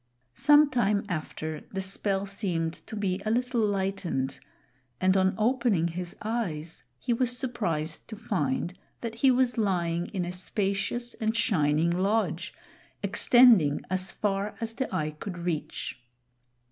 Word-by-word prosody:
Some 295 Hz, -, +5 dB
time 210 Hz, -5 st, +1 dB
after, 155 Hz, -2 st, -4 dB
the 195 Hz, -, -3 dB
spell 195 Hz, +1 st, -1 dB
seemed 180 Hz, -5 st, -2 dB
to -, -, -6 dB
be 195 Hz, -2 st, -1 dB
a 215 Hz, -, -1 dB
little 245 Hz, +1 st, +1 dB
lightened, 190 Hz, -10 st, -1 dB, 0.6 s
and 185 Hz, +1 st, +3 dB
on 190 Hz, 0 st, +3 dB
opening 225 Hz, -7 st, +2 dB
his 175 Hz, +1 st, -5 dB
eyes, 175 Hz, -9 st, -3 dB
he 245 Hz, -, -1 dB
was 245 Hz, +1 st, +1 dB
surprised 170 Hz, -, -2 dB
to 220 Hz, -, -7 dB
find 175 Hz, -6 st, -1 dB, 0.3 s
that 230 Hz, -1 st, -4 dB
he 235 Hz, +4 st, +3 dB
was 250 Hz, -2 st, +2 dB
lying 175 Hz, -4 st, 0 dB
in 185 Hz, -4 st, -3 dB
a 175 Hz, -, -4 dB
spacious 200 Hz, +6 st, -2 dB
and 220 Hz, +1 st, -1 dB
shining 160 Hz, -7 st, +2 dB
lodge 200 Hz, +5 st, 0 dB, 0.5 s
extending 225 Hz, -, +5 dB
as 185 Hz, 0 st, 0 dB
far 200 Hz, 0 st, -1 dB
as 225 Hz, -1 st, -3 dB
the 260 Hz, +3 st, -3 dB
eye 155 Hz, -5 st, -1 dB
could 175 Hz, +4 st, -7 dB
reach. 170 Hz, -6 st, -4 dB
195 Hz, 140 wpm, -28 LUFS, 170-230 Hz, 0.6 s, Some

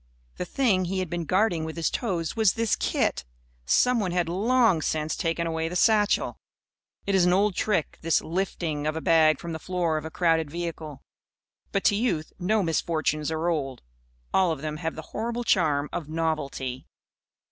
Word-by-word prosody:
The -, -, -3 dB
thing 195 Hz, -4 st, +1 dB
he 190 Hz, +2 st, -2 dB
had 185 Hz, -3 st, -2 dB
been 175 Hz, -1 st, -2 dB
guarding 185 Hz, -2 st, +1 dB
with 160 Hz, 0 st, -5 dB
his 165 Hz, -1 st, -1 dB
toes 175 Hz, -9 st, -2 dB
was 220 Hz, -4 st, +3 dB
this 230 Hz, -2 st, +1 dB
kit. -, -, 0 dB, 0.4 s
Someone 225 Hz, -, +3 dB
had 175 Hz, -1 st, 0 dB
long 210 Hz, 0 st, +3 dB
since 155 Hz, 0 st, -1 dB
taken 165 Hz, 0 st, -1 dB
away 160 Hz, 0 st, -2 dB
the 180 Hz, -, -6 dB
satchel. 210 Hz, +1 st, +2 dB, 0.7 s
It 200 Hz, -, 0 dB
is 190 Hz, -2 st, +4 dB
an 180 Hz, -, +4 dB
old 200 Hz, +2 st, +3 dB
trick, 185 Hz, -4 st, -1 dB
this 165 Hz, 0 st, +2 dB
"lifting" 165 Hz, -4 st, -2 dB
of 155 Hz, -, -1 dB
a -, -, -2 dB
bag 155 Hz, -3 st, +4 dB
from 170 Hz, -, -6 dB
the 160 Hz, -, -4 dB
floor 175 Hz, -1 st, -1 dB
of 155 Hz, -, -5 dB
a -, -, -4 dB
crowded 165 Hz, -2 st, +1 dB
vehicle. 160 Hz, -3 st, -6 dB, 0.7 s
But 195 Hz, -, 0 dB
to 205 Hz, -, +4 dB
youth 200 Hz, -9 st, -1 dB
no 205 Hz, +3 st, +1 dB
misfortunes 155 Hz, -2 st, 0 dB
are 160 Hz, +1 st, -1 dB
old. 140 Hz, -6 st, -2 dB, 0.5 s
All 185 Hz, -3 st, +3 dB
of 155 Hz, -2 st, -5 dB
them 155 Hz, -1 st, -3 dB
have 165 Hz, 0 st, -3 dB
the 160 Hz, -, -7 dB
horrible 235 Hz, +1 st, -2 dB
charm 150 Hz, -9 st, +2 dB
of 160 Hz, -4 st, -4 dB
novelty. 150 Hz, -5 st, -3 dB
170 Hz, 180 wpm, -26 LUFS, 155-190 Hz, 0.7 s, is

